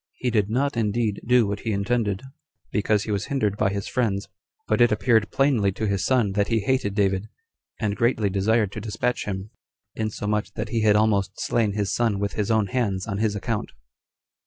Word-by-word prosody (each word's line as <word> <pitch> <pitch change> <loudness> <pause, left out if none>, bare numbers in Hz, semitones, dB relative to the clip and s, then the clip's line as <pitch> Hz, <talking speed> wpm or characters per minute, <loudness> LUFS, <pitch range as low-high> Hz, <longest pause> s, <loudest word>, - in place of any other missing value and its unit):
He 125 - -2
did 105 -3 +1
not 140 +5 0
indeed 110 -1 0
do 125 -1 +5
what 100 0 -3
he 115 - -3
intended, 105 0 0 0.5
because 105 0 +1
he 110 - -4
was 100 -1 -1
hindered 130 -9 0
by 95 - +1
his 100 0 -3
friends; 105 -5 -1 0.4
but - - +2
it 120 -1 +6
appeared 105 +1 +2
plainly 130 -8 +2
to 110 - -3
his 100 -2 0
son 120 -6 +2
that 100 +1 +1
he 115 -2 +1
hated 100 -3 0
David, 100 0 +1 0.5
and 105 -3 -1
greatly 115 -2 +1
desired 105 +1 +2
to 105 - -6
despatch 115 +3 -2
him, 100 +1 -5 0.4
insomuch 105 -1 -2
that 105 0 -4
he 115 0 0
had 105 -1 +4
almost 100 -3 +1
slain 110 -4 +1
his 100 -1 -1
son 115 -4 +1
with 100 0 -2
his 105 0 -2
own 110 -2 +3
hands 100 -5 -1
on 100 -2 -3
his 110 -2 +1
account. 105 +1 -3
105 Hz, 195 wpm, -24 LUFS, 100-115 Hz, 0.5 s, it